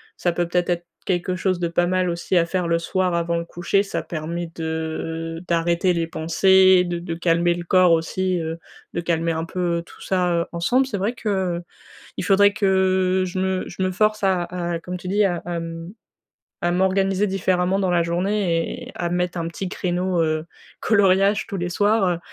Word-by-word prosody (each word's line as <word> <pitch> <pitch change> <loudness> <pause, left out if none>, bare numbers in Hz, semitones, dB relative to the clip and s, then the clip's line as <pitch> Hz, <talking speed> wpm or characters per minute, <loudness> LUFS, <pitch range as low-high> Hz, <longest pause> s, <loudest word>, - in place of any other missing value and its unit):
ça 175 - 0
peut 175 0 -1
peut-être 175 0 0
être 175 0 -1 0.2
quelque 180 0 0
chose 185 0 0
de 175 - 0
pas 175 +1 +1
mal 185 -1 +1
aussi 170 +2 -1
à 170 - +4
faire 180 0 -1
le 170 - +2
soir 180 +1 0
avant 170 0 0
le 170 - -3
coucher. 175 +4 0
Ça 200 - -3
permet 170 +1 -5
de 165 0 -4
d'arrêter 170 +2 +1
les 165 -1 0
pensées, 185 +3 +4
de 175 -1 -3
de 170 -1 -5
calmer 170 0 +2
le 175 - -5
corps, 180 0 +4
aussi, 180 +3 0
heu, 165 0 -4 0.3
de 170 - -2
calmer 165 -1 0
un 160 0 -2
peu 170 -1 -1
tout - - -17
ça, 180 -2 0
heu, 170 0 +1
ensemble. 245 +11 +2
C'est 205 -7 -4
vrai 210 +5 0
que, 235 - -7 0.3
heu, 175 - -7 0.5
il - - -2
faudrait 200 +1 +5
que 190 -2 +2
je 180 +1 -6
me 190 0 0
je 190 - -4
me 185 - 0
force 215 +2 +1
à 190 -2 +2
à 175 -1 -3
comme 180 +2 -6
tu 180 - -9
dis, 205 +3 +2
à 180 -3 +2
à, 175 -1 -3
mmh, 165 +2 -7 0.7
à 175 - +1
m'organiser 190 +2 +2
différemment 190 0 +1
dans 185 - +1
la 170 -1 +2
journée 175 -1 -1
et - - -11
à 175 -1 -3
me 175 - 0
mettre 180 0 -1
un 165 -1 -2
petit 185 +2 -5
créneau, 180 -1 -1
heu, 155 0 -1 0.3
coloriage, 200 -1 +3
tous 200 - -4
les 175 -1 -3
soirs, 205 +2 +2
heu 175 -2 0
180 Hz, 205 wpm, -22 LUFS, 170-190 Hz, 0.7 s, faudrait